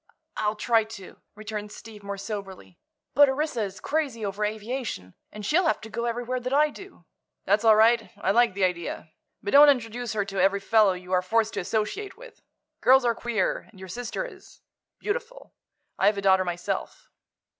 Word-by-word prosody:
"I'll 210 0 0
try 225 +1 +2
to," 215 -4 -12
returned 210 -1 -6
Steve, 215 -1 -11
more 200 0 -5
soberly. 195 - -7 0.3
"But 285 -1 +6
Orissa 270 -3 -1
is 195 -2 -4
crazy 280 -8 -2
over 200 +1 -3
aviation, 215 - -4 0.2
and 210 -1 -8
she'll 345 - +2
have - - +1
to 220 - -10
go 235 +3 -3
everywhere 245 +2 -2
that 250 +1 -5
I 300 +1 +4
do." 390 +5 -13 0.4
"That's - - +2
all 220 -1 +7
right; 225 +1 +4
I 195 - 0
like 235 -2 +3
the 200 - 0
idea. 170 -3 -2 0.3
But 205 - -3
don't 290 +1 +9
introduce 240 -3 -1
her 205 -2 -1
to 195 -2 -2
every 195 +1 +3
fellow 210 -1 +4
you 180 0 -10
are 180 - +4
forced 220 +4 +1
to - - -2
associate 230 - -3
with. - - -14 0.4
Girls 265 0 +5
are 235 - +3
queer, 225 -5 -2
and 195 - -18
your 190 0 -9
sister 245 - -4
is—beautiful. 485 0 -8 0.5
I've 205 0 +3
a - - -2
daughter 190 -1 +4
myself." 175 0 -4
220 Hz, 180 wpm, -26 LUFS, 200-250 Hz, 0.5 s, don't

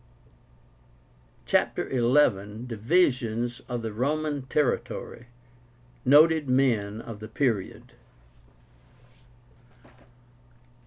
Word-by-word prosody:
CHAPTER - - 0
XI. 120 -5 +2
DIVISIONS 120 - 0
OF 120 -2 -4
THE 110 -1 -4
ROMAN 145 +3 -2
TERRITORY. 125 -4 -2 0.8
NOTED 150 +2 +5
MEN 115 -5 +1
OF 115 -3 -9
THE 110 - -8
PERIOD. 110 -4 -2
120 Hz, 65 wpm, -26 LUFS, 110-145 Hz, 0.8 s, NOTED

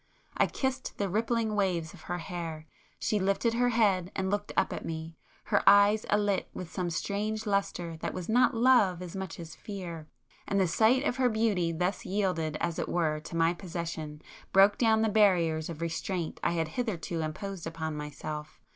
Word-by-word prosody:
I - - +3
kissed 265 -1 -3
the 200 - 0
rippling 220 +2 0
waves 180 -5 0
of - - -13
her 175 - -1
hair; 165 -3 -5 0.3
she 210 - 0
lifted 195 +4 +1
her 245 +1 +2
head 200 -6 +2
and 190 0 -1
looked 205 0 -1
up - - +2
at - - -5
me, 160 0 -5 0.3
her 205 - +2
eyes 205 +2 +5
alit 205 -2 +1
with 180 -2 -6
some 180 -2 -2
strange 210 +5 -2
lustre 185 -5 -1
that - - -3
was 180 -2 -6
not 245 +2 +4
love 225 -7 +4
as 175 0 -8
much 190 -3 -5
as 165 -1 -8
fear,—and 180 0 -6
the 190 - +3
sight 225 +10 +3
of 265 -3 0
her 255 -1 +3
beauty 215 -7 +1
thus 180 +4 -1
yielded 180 -6 -1
as 170 -1 -1
it - - -2
were 155 -3 +1
to 155 - -9
my 165 +1 +3
possession, 170 -4 -6 0.3
broke 195 +1 +5
down 220 -2 +4
the - - +3
barriers 175 -7 +3
of 165 -1 -7
restraint 170 +1 -3
I - - +2
had 165 -2 -1
hitherto 175 -6 -3
imposed 170 +3 -5
upon 160 -1 -4
myself. 150 +1 -6
185 Hz, 180 wpm, -29 LUFS, 165-210 Hz, 0.3 s, eyes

